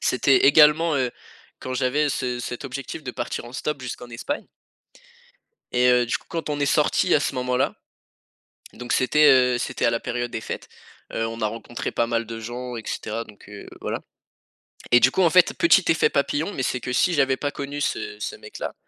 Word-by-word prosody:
C'était 135 +1 +3
également, 150 +2 +6
heu, 125 -2 0 0.5
quand 130 0 -5
j'avais 140 +4 +1
ce 125 -2 -2
cet 125 +3 -6
objectif 135 +3 -6
de 125 - -5
partir 120 0 -4
en 120 - -11
stop 145 +1 -3
jusqu'en 125 -1 -7
Espagne 205 - -4 1.3
et 125 0 +3
heu, 125 -1 +3
du - - 0
coup, - - -25
quand 165 -2 -4
on 145 -1 -2
est 145 - +2
sortis 150 0 +2
à 150 - +4
ce 140 - -2
moment-là, 125 0 0 1.0
donc 125 0 -5
c'était, 150 +4 +4
heu, 125 -2 +4
c'était - - -3
à - - +4
la 115 0 -1
période 120 -1 -3
des 110 - -4
fêtes, - - -6 0.4
heu, 115 - -1
on 115 0 -6
a 110 - +1
rencontré 115 +2 -5
pas 115 - +1
mal 115 0 -1
de 115 0 -7
gens 120 +2 -6
et 115 - -6
cetera 115 +2 -4
donc 105 -2 -17
heu, 105 -1 -10
voilà - - -3 0.9
et 120 - +7
du 125 +2 +4
coup, 190 - +2
en 170 - +5
fait, 180 0 +5
petit 335 - +4
effet 160 - +2
papillon 145 +6 0
mais 130 - -2
c'est 125 - -1
que 125 - -4
si 175 +6 +2
j'avais 135 -2 +2
pas 145 +1 -3
connu 140 +1 -5
ce 425 - -3
ce - - -4
mec-là, 435 -1 -7
130 Hz, 205 wpm, -23 LUFS, 120-145 Hz, 1.3 s, et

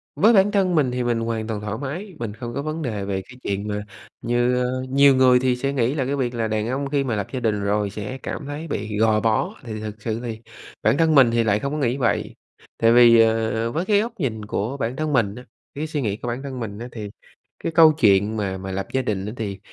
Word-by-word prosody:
Với 220 +4 +5
bản 200 -1 +5
thân 190 -4 +2
mình 140 -5 +2
thì 125 0 -1
mình 120 -1 0
hoàn 115 -1 -2
toàn 110 -2 -3
thoải 105 +1 -4
mái, 175 +8 -6
mình 110 -3 -4
không 120 +1 -7
có 140 - -2
vấn 155 +2 -4
đề 110 -8 -3
về 95 -1 -2
cái 125 - -13
chuyện 100 +1 -2
mà 105 -1 -2 0.4
như, 120 +1 +1
ờ 130 +1 -2
nhiều 140 +1 +5
người 130 -1 +5
thì 130 -1 +1
sẽ 135 +3 -2
nghĩ 125 -1 +1
là 140 -4 -1
cái 140 +2 -1
việc 125 -3 -2
là 115 -1 -1
đàn 110 0 -1
ông 135 +2 -2
khi 140 -1 +1
mà 125 -4 -1
lập 100 -2 -3
gia 130 - -1
đình 110 -4 0
rồi 100 0 0
sẽ 105 +5 -6
cảm 145 - -5
thấy 145 +3 -6
bị 105 -6 -3
gò 110 0 +3
bó, 115 - 0
thì 110 -3 -6
thực 105 0 -7
sự 110 0 -2
thì 115 -2 -5 0.4
bản - - +3
thân 160 -1 +3
mình 130 -4 +6
thì 115 0 +2
lại 105 -2 +2
không 140 +3 -3
có - - -2
nghĩ 130 -3 0
vậy. 125 -4 -1 0.4
Tại 115 0 +4
vì, 120 -1 +7
ờ, 115 0 +2
với 165 +8 -2
cái 205 0 +3
góc 230 +2 -4
nhìn 110 -8 -2
của 110 +6 -3
bản 120 -1 -2
thân 155 +1 -2
mình 105 -6 +1
á, 125 - -9 0.3
cái 150 +3 -3
suy 150 -2 -3
nghĩ 105 -4 -1
của 120 - -7
bản 120 +3 -3
thân 135 -2 -6
mình 105 -3 -5
á 120 - -6
thì 105 -3 -6 0.6
cái - - -1
câu 160 -1 +7
chuyện 105 -6 +3
mà 95 -3 -2
mà 95 0 -6
lập 95 +1 -3
gia 130 - +1
đình 100 -5 -2
á 105 - -4
thì 100 -4 -4
120 Hz, 270 wpm, -22 LUFS, 110-140 Hz, 0.6 s, vì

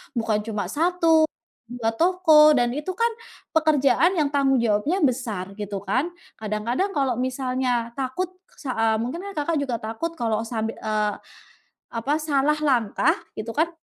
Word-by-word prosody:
Bukan 220 -2 +1
cuma 205 -4 -3
1, 325 0 +3 0.4
2 230 -2 -2
toko 320 +1 +5
dan 240 0 +1
itu 305 +6 -4
kan 465 0 +2 0.4
pekerjaan 315 +2 +3
yang 295 -2 +1
tanggung 270 -2 +3
jawabnya 235 - +1
besar, 220 -8 -2
gitu 205 -1 -5
kan. 290 +7 0 0.3
Kadang-kadang 220 - -1
kalau 265 -3 +2
misalnya 255 -2 -1
takut 275 +8 -2 0.3
sa 280 -4 -7
eee, 225 0 +3
mungkin 260 +9 -4
Kakak 310 0 -1
juga 255 -4 -2
takut 230 +10 -4
kalau 225 -2 0
sab 225 -1 -2
eee, 215 -2 -1 0.8
apa, 235 +5 -1
salah 300 0 +1
langkah 265 +1 +2 0.2
gitu 225 +1 -5
kan, 325 +3 +1
260 Hz, 145 wpm, -24 LUFS, 225-310 Hz, 0.8 s, toko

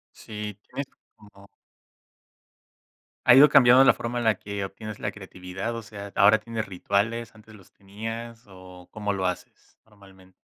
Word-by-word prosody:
Sí, 105 -1 -7
tienes 135 +1 -6 0.3
como 105 -2 -18 1.8
¿Ha - - +9
ido 140 +4 +8
cambiando 125 +1 +7
la - - +6
forma 120 +1 -4
en - - -3
la 110 -2 +3
que 100 +1 -6
obtienes 105 +2 -8
la - - -3
creatividad? 95 +2 -7
O 115 - -5
sea, 100 -2 -10
¿ahora 105 +2 +6
tienes 110 0 -5
rituales? 100 +5 -2
¿Antes 110 0 -17
los 100 -4 -19
tenías 115 +4 -8
o 90 -2 -14
cómo 105 -1 -3
lo 95 -1 -3
haces 90 -1 -6
normalmen 95 -3 -20
105 Hz, 155 wpm, -25 LUFS, 95-115 Hz, 1.8 s, Ha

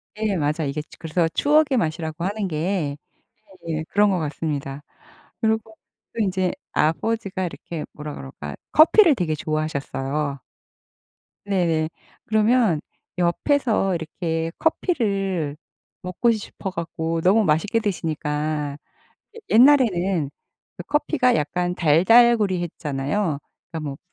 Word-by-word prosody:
네. 215 -2 -1
맞아요. 150 0 0
이게 150 +2 -3 0.2
그래서 165 +1 0
추억의 290 - +3
맛이라고 160 -3 -2
하는 200 +2 -1
게 160 -3 -2 0.7
예 160 -1 -2
그런 205 0 +4
거 185 -2 +1
같습니다. 145 -2 -4 0.6
그리고 220 0 0 0.4
또 - - -6
인제 185 -2 0 0.2
아버지가 190 +4 0
이렇게 170 -2 -6
뭐라 150 0 -7
그럴까 70 +1 -8 0.2
커피를 325 +1 +7
되게 165 -7 -1
좋아하셨어요. 150 -2 -2 1.1
네네. 170 -5 +1 0.4
그러면 220 -5 +3 0.4
옆에서 195 - +1
이렇게 165 0 -3
커피를 195 - 0 0.4
먹고 185 +6 +1
싶어 210 -3 -4
갖고 165 -2 -3
너무 200 +6 +4
맛있게 180 +7 +1
드시니까. 150 -6 -2 0.6
예 - - -8
옛날에는 200 - +4 0.6
커피가 290 -4 +2
약간 175 +4 -1
달달구리했잖아요. 175 - +2 0.3
그러니까 165 - -4
뭐 135 - -7
175 Hz, 270 characters per minute, -23 LUFS, 155-215 Hz, 1.1 s, 커피를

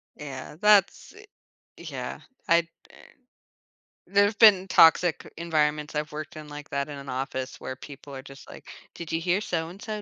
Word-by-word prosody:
Yeah, 140 -1 -8
that's 210 - +3 0.4
i - - -19
yeah. - - -6 0.3
I've 170 0 +4 0.2
been - - -18 1.1
there've 205 +2 +3
been 195 -4 +7
toxic 165 0 +5
environments 150 -2 0
I've 150 0 -2
worked 155 +1 -7
in 155 -1 -9
like 145 0 -10
that, 140 +1 -2
in 145 - -7
an 140 -1 -9
office, 130 0 -4
where 130 - -6
people 140 +1 -11
are 130 - -7
just 135 -1 -13
like, - - -13 0.3
"Did 170 -2 -8
you 160 - 0
hear 180 +3 +1
so-and-so 195 +5 -4
155 Hz, 160 wpm, -26 LUFS, 140-180 Hz, 1.1 s, been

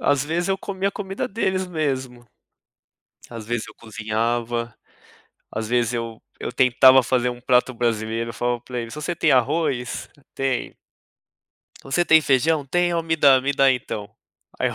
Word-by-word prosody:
Às 145 -1 +2
vezes 170 +4 -1
eu 195 0 0
comia 195 0 -2
a - - -6
comida 195 -1 -4
deles 190 -3 -1
mesmo. 130 -7 -3 1.1
Às 115 -2 -8
vezes 120 0 -3
eu - - -13
cozinhava, 115 +1 -2 0.8
às 110 0 -4
vezes 120 0 +1
eu 115 -1 -4 0.2
eu - - -4
tentava 130 0 +6
fazer 125 0 +1
um 120 0 -9
prato 125 +1 +2
brasileiro, 115 0 -1
falava 120 0 -1
pra 125 0 -6
eles: 115 -1 -7
"Você 150 +3 -3
tem - - +3
arroz?". 130 -1 0 0.3
"Tenho". 135 -2 -2 1.1
"Você 155 +6 0
tem 160 -1 +6
feijão?". 145 +2 +2
"Tem". 175 +5 +1
"Ó, 165 - 0
me 160 0 -1
dá, 135 -4 +6
me 140 +2 0
dá 135 -1 +4
então". 110 -5 -3 0.5
Aí - - +1
eu - - -6
130 Hz, 165 wpm, -22 LUFS, 120-155 Hz, 1.1 s, tentava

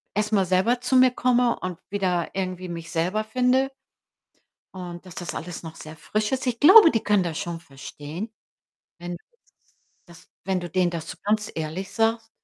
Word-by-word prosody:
erst 210 +1 0
mal 195 -2 +4
selber 190 +7 +2
zu 250 +1 0
mir 255 0 +7
komme 245 -1 +2
und 185 -2 -4
wieder 185 -4 0
irgendwie 185 -1 -3
mich 165 -1 -7
selber 180 +6 0
finde“ 255 +3 +2 1.0
und 175 -1 -8
dass 185 - -11
das 175 -3 -5
alles 175 0 -6
noch 160 0 -8
sehr 155 0 -10
frisch 210 +8 -2
ist. 265 0 -1
Ich 235 -2 -1
glaube, 360 +2 +9
die 225 - +1
können 205 -2 +2
das 165 -3 -3
schon 170 -1 -4
verstehen, 155 +6 -8 0.7
wenn 175 0 -7
du - - -34 0.8
das 175 +1 -16 0.2
wenn 190 -1 0
du 175 -1 -6
denen 180 +1 +1
das 165 -2 -5
so - - -7
ganz 210 +1 0
ehrlich 160 +4 -4
sagst. 225 0 +1
185 Hz, 185 wpm, -25 LUFS, 170-225 Hz, 1.0 s, glaube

